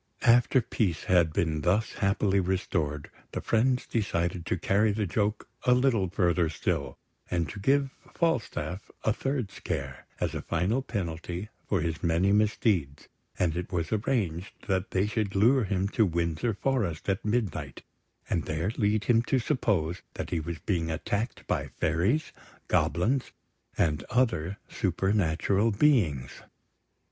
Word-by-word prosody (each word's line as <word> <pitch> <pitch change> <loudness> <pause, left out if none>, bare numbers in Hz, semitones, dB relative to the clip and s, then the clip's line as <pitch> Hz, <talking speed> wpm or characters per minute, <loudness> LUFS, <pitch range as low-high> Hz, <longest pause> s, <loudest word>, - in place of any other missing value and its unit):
After 120 +2 +5
peace 95 -8 -1
had 85 -3 +3
been 80 -1 0
thus 100 +7 +1
happily 100 -1 +1
restored, 85 -5 -1 0.2
the - - -2
friends 125 +3 +1
decided 85 -5 -1
to - - 0
carry 105 +5 +2
the 105 0 0
joke 105 +3 -1 0.2
a 125 - +5
little 120 -8 +2
further 85 -2 +2
still, 80 - -2 0.3
and 85 -2 0
to - - -7
give 135 +5 +2 0.2
Falstaff 120 - -1
a 110 - +2
third 130 -4 -2
scare, - - -5
as - - -1
a - - -3
final 90 +10 0
penalty 90 -3 -4 0.2
for - - +2
his 80 -1 -2
many 85 +3 +2
misdeeds; 105 - +1 0.3
and 85 -3 +1
it 90 0 -4
was 85 -3 -2
arranged 100 -6 -1
that 95 -1 0
they 95 +1 +1
should 105 -2 -2
lure 120 +5 +4
him 95 0 0
to 110 0 +3
Windsor 85 +5 -1
Forest 105 - -1
at 95 -1 0
midnight, 105 - -2 0.4
and 80 - -1
there 80 +6 -1
lead 105 -1 +2
him 115 0 +4
to 130 +3 +1
suppose 100 - 0
that - - -5
he 85 - +1
was 85 +1 -4
being 80 0 -1
attacked 100 +8 -3
by - - -1
fairies, 95 - +1 0.4
goblins, 110 - +1 0.5
and 75 -3 +1
other 105 -7 +1
supernatural 95 +2 +1
beings. 100 - +2
95 Hz, 145 wpm, -28 LUFS, 85-110 Hz, 0.5 s, After